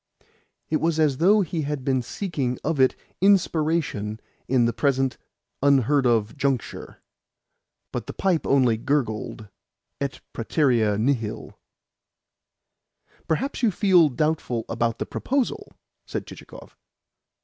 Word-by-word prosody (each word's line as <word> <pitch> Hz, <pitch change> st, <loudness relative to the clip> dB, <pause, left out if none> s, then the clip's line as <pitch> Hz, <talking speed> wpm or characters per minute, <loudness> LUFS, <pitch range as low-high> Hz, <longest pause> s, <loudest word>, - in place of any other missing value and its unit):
It 155 Hz, -, +3 dB
was 160 Hz, 0 st, 0 dB
as 150 Hz, -4 st, +2 dB
though 200 Hz, +7 st, +5 dB
he 170 Hz, -3 st, -2 dB
had 145 Hz, -3 st, -4 dB
been 130 Hz, -2 st, +1 dB
seeking 135 Hz, -, -3 dB
of 155 Hz, -1 st, -1 dB
it 130 Hz, -1 st, +4 dB, 0.3 s
inspiration 160 Hz, -, +1 dB, 0.3 s
in 125 Hz, -2 st, +3 dB
the 115 Hz, -, +1 dB
present 135 Hz, -1 st, 0 dB, 0.4 s
unheard 140 Hz, -1 st, +3 dB
of 110 Hz, -3 st, +1 dB
juncture. 140 Hz, -4 st, -3 dB, 0.9 s
But -, -, -4 dB
the -, -, -5 dB
pipe 185 Hz, -4 st, 0 dB
only 125 Hz, -5 st, +3 dB
gurgled, 110 Hz, -5 st, -2 dB, 0.5 s
et 140 Hz, -1 st, -4 dB
praeterea 115 Hz, -4 st, +1 dB
nihil. 115 Hz, -3 st, -2 dB, 1.7 s
"Perhaps 265 Hz, -, -1 dB
you 235 Hz, -, +4 dB
feel 180 Hz, -5 st, +4 dB
doubtful 130 Hz, -5 st, -1 dB
about 115 Hz, -1 st, -1 dB
the -, -, -3 dB
proposal?" 285 Hz, -, -2 dB, 0.4 s
said -, -, -4 dB
Chichikov. -, -, -12 dB
140 Hz, 115 wpm, -24 LUFS, 120-160 Hz, 1.7 s, though